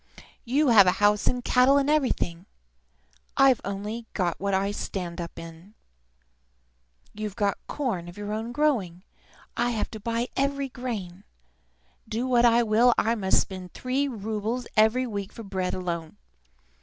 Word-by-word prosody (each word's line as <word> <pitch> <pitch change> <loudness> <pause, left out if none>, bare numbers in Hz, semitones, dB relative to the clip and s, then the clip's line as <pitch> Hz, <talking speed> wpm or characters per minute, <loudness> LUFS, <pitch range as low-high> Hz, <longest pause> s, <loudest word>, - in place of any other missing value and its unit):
You 275 +4 +2
have 205 -5 +7
a 180 - +5
house, 205 0 +3
and 250 -1 0
cattle, 260 +2 +5
and 280 0 +2
everything; 250 - 0 0.9
I've 270 -3 +5
only 210 +4 -5 0.3
what 200 0 0
I 195 +1 0
stand 180 -4 -4
up 170 - -8
in! 165 +5 -11 1.4
You 215 0 -4
have 205 -3 +2
corn 230 -12 -3
of 175 - -13
your 205 0 -4
own 225 +2 -3
growing; 230 - 0 0.5
I 240 +1 +1
have 225 -3 -2
to 220 - -7
buy 230 +3 -2
every 275 0 0
grain. 210 -8 -6 0.9
Do 230 +3 -1
what 245 -2 +4
I 235 0 +5
will, 230 +2 +4
I 225 - +2
must 195 -4 +2
spend 185 -2 -8
three 265 +3 -1
roubles 220 +1 -3
every 220 +4 +4
week 200 -4 -5
for 230 - -9
bread 190 -2 -2
alone. 170 - -4
220 Hz, 150 wpm, -26 LUFS, 195-245 Hz, 1.4 s, have